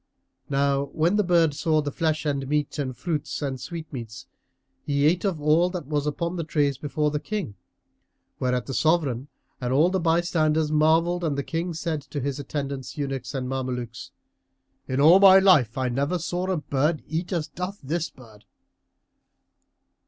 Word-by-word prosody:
Now 140 0 +1
when 170 +5 +2
the 210 - +3
bird 170 -4 +3
saw 155 +2 +1
the 145 -1 -2
flesh 155 +1 -1
and 140 -2 -1
meats 150 +1 -1
and 130 -4 -3
fruits 155 0 -3
and 130 -3 -3
sweet 165 -2 -6
meats, 115 -1 -7 0.6
he 140 0 +1
ate 170 +4 +3
of 190 -6 -1
all 155 +4 +3
that 180 -4 -5
was 145 0 -1
upon 170 +4 -2
the 165 - -2
trays 145 -4 0
before 150 0 -1
the 150 - -1
King, 190 - -4 0.9
whereat 125 -1 0
the 135 - -5
Sovran 145 -5 +1 0.3
and 125 0 -2
all 155 +7 +4
the 190 - +1
bystanders 160 -2 +1
marvelled 165 +3 +3
and 150 -4 -1
the 140 - -1
King 165 +2 -3
said 160 -2 -2
to 145 +1 -6
his 140 +1 -3
attendants, 140 -1 -5
eunuchs 135 -1 -4
and 130 -1 -2
Mamelukes, 125 -2 -4 0.8
"In 130 +1 -1
all 165 +6 +7
my 195 -1 +9
life 155 - +4
I 130 -1 0
never 140 +8 0
saw 175 +2 -3
a 185 - +1
bird 150 +1 0
eat 165 +4 -3
as 165 -5 -1
doth 180 +5 -6
this 160 +3 -2
bird!" 110 -5 -17
150 Hz, 175 wpm, -25 LUFS, 135-170 Hz, 0.9 s, my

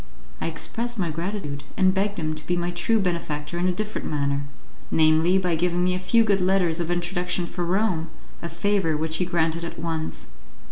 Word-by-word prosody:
I - - 0
expressed 235 +8 -2
my 175 -5 0
gratitude, 165 -4 -4
and 185 -1 +4
begged 200 +1 0
him 155 -2 -1
to 155 0 -6
be 175 - +1
my 175 0 -1
true 195 +6 +1
benefactor 170 -3 -2
in 180 - +2
a - - +3
different 215 +4 -3
manner 140 -1 0 0.4
namely, 160 +3 +4
by 180 -2 +1
giving 175 +2 +1
me 180 0 +2
a 180 - -1
few 225 +5 +4
good 200 -3 +2
letters 180 -3 +2
of 170 -1 -2
introduction 175 0 0
for 175 +1 -4
Rome, 175 -2 +1 0.3
a 170 - -4
favour 195 -7 +1
which 160 +1 0
he 180 - +1
granted 170 -1 0
at 170 - -6
once. 160 - -4
175 Hz, 195 wpm, -25 LUFS, 160-190 Hz, 0.4 s, and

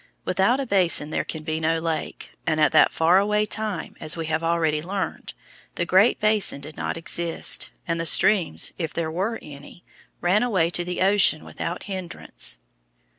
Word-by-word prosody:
Without 195 +8 +2
a 275 - -2
basin 180 - +2
there - - -1
can 160 -1 -7
be 155 0 -2
no 160 +1 +1
lake, 160 -1 -4 0.2
and 155 -1 +1
at 155 - +4
that - - +5
far 170 +3 +4
away 210 +1 +1
time, 215 -3 -4
as 155 - -1
we 165 - -3
have 160 +1 -1
already 165 -2 +1
learned, 190 +4 -5 0.4
the 170 - -1
Great 190 +6 +4
Basin 215 -8 +1
did 150 +2 -10
not - - -3
exist, 165 0 -1 0.2
and 165 -1 -1
the 165 - -2
streams, 195 -3 +3
if 165 -2 -3
there 160 -2 -2
were 195 +7 -2
any, 145 +4 -12 0.3
ran 185 +5 +2
away 190 -9 +1
to 175 - 0
the 180 +1 -4
ocean 195 -5 +3
without 170 +2 -5
hindrance. 180 - -4
170 Hz, 180 wpm, -24 LUFS, 160-195 Hz, 0.4 s, that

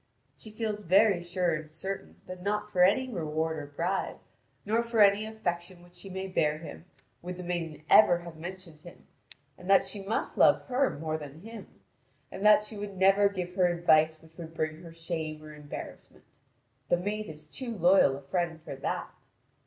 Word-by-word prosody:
She 140 +10 -10
feels 215 -1 -3
very 195 0 +4
sure 175 0 0
and 155 0 -5
certain 190 +5 -6
that 185 0 -8
not 210 +2 -1
for 180 - +1
any 205 +8 +4
reward 160 -6 -2
or 145 - -7
bribe, 170 +7 -2 0.5
nor 220 +3 +2
for 235 -1 -2
any 205 +1 +5
affection 175 -4 -4
which 175 0 -19
she 195 +2 -8
may 190 +1 -4
bear 155 -5 +1
him, 165 +1 -10 0.4
would 180 +1 -6
the 180 - -7
maiden 165 -4 -4
ever 175 -5 +7
have 170 -1 -10
mentioned 175 -1 -9
him; 175 +3 -15 0.5
and 180 - -10
that 195 - +6
she 205 - -4
must 195 +3 -3
love - - +5
her 260 +1 +1
more 155 +1 -3
than 150 +1 -10
him, 225 0 -11 0.5
and 195 - -7
that 210 0 +7
she 210 0 -8
would 200 -1 -6
never 195 +2 +5
give 180 -2 -5
her 180 -1 +3
advice 160 -2 +3
which 160 0 -20
would 165 -1 -9
bring 155 0 -3
her 170 -2 -11
shame 160 -2 -5
or 155 0 -10
embarrassment: 150 -1 -10 0.7
the 175 - +4
maid 210 +4 -3
is 155 -1 -11
too 235 - -5
loyal 175 -6 +5
a - - -11
friend 170 +2 -2
for 140 - -7
that. 135 - -4
175 Hz, 190 wpm, -29 LUFS, 160-200 Hz, 0.7 s, ever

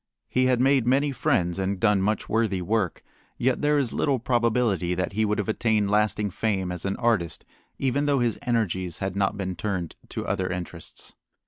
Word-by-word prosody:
He 130 0 +2
had 125 -2 +2
made 130 -2 +3
many 140 +3 +3
friends 90 -8 0
and 95 0 -1
done 105 -1 +3
much 105 +2 0
worthy 110 -4 +1
work, 95 0 -1 0.3
yet 130 +1 +1
there 150 0 +3
is 135 -5 0
little 140 -2 +1
probability 115 -7 +1
that 90 +2 -2
he 110 +2 +1
would 105 0 0
have 105 - -2
attained 110 -2 +1
lasting 105 -1 +1
fame 95 -3 -1
as 90 0 -5
an 95 - 0
artist 105 -9 0 0.3
even 140 +2 0
though 140 -1 +3
his 120 -3 0
energies 100 - -1
had 95 -1 -3
not 100 0 0
been 95 -2 -3
turned 90 -2 -3
to - - -4
other 95 -1 -1
interests. 90 -2 -6
105 Hz, 190 wpm, -26 LUFS, 95-120 Hz, 0.3 s, made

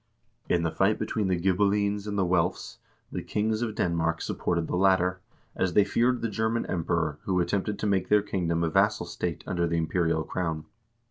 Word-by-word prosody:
In 85 -1 +2
the 80 - 0
fight 95 +6 +2
between 105 -3 -1
the 90 -2 +1
Ghibellines 100 +2 +1
and 105 -1 -3
the 95 - +2
Welfs, 90 0 0 0.3
the - - -3
kings 110 +1 -1
of 110 -3 -2
Denmark 85 -1 0
supported 85 -2 -1
the - - -3
latter, 95 0 +3 0.4
as 95 -2 0
they 105 - +6
feared 120 +5 +1
the 115 - 0
German 110 +2 -1
Emperor, 80 -3 -1
who 95 -2 +1
attempted 100 +4 -1
to - - -3
make 95 -3 +1
their 105 -1 +4
kingdom 85 -5 -1
a 85 - +1
vassal 100 +1 +2
state 85 -1 -4
under 85 -1 0
the 85 0 0
im 80 - +1
perial 80 -2 0
crown. 80 -4 -3
95 Hz, 195 wpm, -27 LUFS, 85-105 Hz, 0.4 s, they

